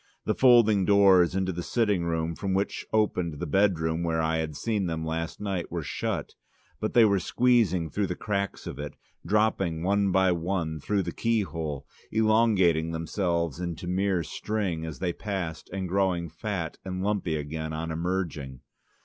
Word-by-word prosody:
The - - +2
folding 115 -6 +5
doors 95 -3 +5
into 95 -1 0
the 90 0 -4
sitting 105 -3 +1
room 80 0 -1
from 95 +1 -2
which 100 +1 -2
opened 90 -7 +1
the - - -2
bedroom 85 -2 +1
where 85 -1 0
I 80 0 +1
had 80 -2 -3
seen 100 +5 -1
them 80 -1 -3
last 80 +1 -3
night 95 -4 -3
were - - -3
shut, - - -3 0.5
but 110 - -3
they 120 -2 +8
were 100 -2 +3
squeezing 95 -7 +2
through 100 -1 0
the 90 - -3
cracks 100 -1 -3
of 65 - -6
it 75 0 -5
and - - -19
dropping 95 -6 +1
one 100 +1 +2
by 95 0 +4
one 85 -2 -2
through 100 +6 0
the - - -4
keyhole, 85 - -2 0.3
elongating 110 -7 +3
themselves 85 -1 -1
into 85 0 -4
mere 90 0 0
string 95 -5 -3
as 80 - -6
they 90 -1 -1
passed, 95 -6 -4
and 95 0 -3
growing 90 -2 0
fat 85 0 -4
and 95 -1 -4
lumpy 100 -6 0
again 80 +1 -4
on 80 +1 -3
emerging. 80 -7 -3
90 Hz, 170 wpm, -27 LUFS, 80-100 Hz, 0.5 s, they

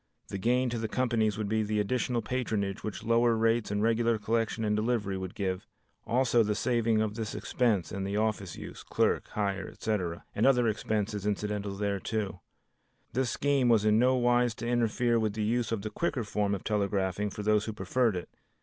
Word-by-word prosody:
The 100 - -4
gain 125 +4 +2
to 120 - -2
the 110 - -2
companies 110 -4 +1
would 110 -2 -2
be 110 +1 +1
the 105 0 0
additional 120 +3 0
patronage 110 -6 -2
which 110 0 -5
lower 115 +1 +3
rates 115 0 +2
and 105 +1 0
regular 115 0 +2
collection 115 +1 -1
and 105 0 +1
delivery 105 -3 0
would 95 -1 -5
give, 95 +1 -2 0.4
also 120 -1 +3
the 105 -1 +1
saving 115 -3 +2
of 105 -1 -2
this 110 -1 -4
expense 110 -9 0
and 100 -1 -3
the 100 +1 -2
office 105 -4 -1
use, - - -9
clerk - - 0
hire, 100 -2 -1
etc., 90 -7 -3
and 110 - +2
other 125 -3 +4
expenses 105 -1 -1
incidental 105 -1 -2
thereto. 100 -1 -2 0.7
This 130 +1 +1
scheme 140 -1 +2
was 110 -3 +4
in 105 0 +4
no 130 +2 +4
wise 120 -1 +2
to 115 - -5
interfere 120 0 +2
with 110 -2 0
the 110 0 -2
use 115 +1 0
of 110 -3 -2
the 110 - -4
quicker 145 -8 -1
form 100 -1 0
of 95 - -7
telegraphing 100 -1 0
for 105 +1 -6
those 105 0 +2
who 110 - -3
preferred 105 +3 +1
it. 90 - -4
110 Hz, 195 wpm, -29 LUFS, 105-120 Hz, 0.7 s, other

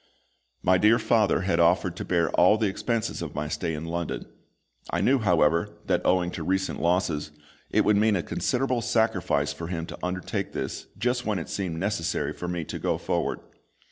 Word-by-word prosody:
My 90 0 +4
dear 110 +4 +5
father 110 -5 +2
had 95 -3 0
offered 85 +1 +3
to - - -4
bear 85 -3 +1
all 95 +5 +5
the 110 - +1
expense 110 +3 -2
of - - -6
my 75 +1 -2
stay 80 +1 -2
in 75 +2 -5
London. 85 0 -3 0.6
I - - -1
knew, 135 +1 +3
however, 85 -5 +2
that, - - +1
owing 90 -1 +2
to 85 - -6
recent 95 +3 -1
losses, 85 -4 +1 0.4
it - - +2
would 105 -1 +4
mean 105 0 +3
a 90 - -1
considerable 125 -1 0
sacrifice 110 -11 +1
for 85 +3 -6
him 85 -2 -3
to - - -9
undertake 90 0 -3
this - - -4
just 125 +3 -1
when 105 -2 +1
it 85 - -5
seemed 90 -5 -3
necessary 95 -3 -1
for 90 - -6
me 90 -1 -2
to - - -6
go - - 0
forward. - - -2
90 Hz, 190 wpm, -26 LUFS, 85-105 Hz, 0.6 s, dear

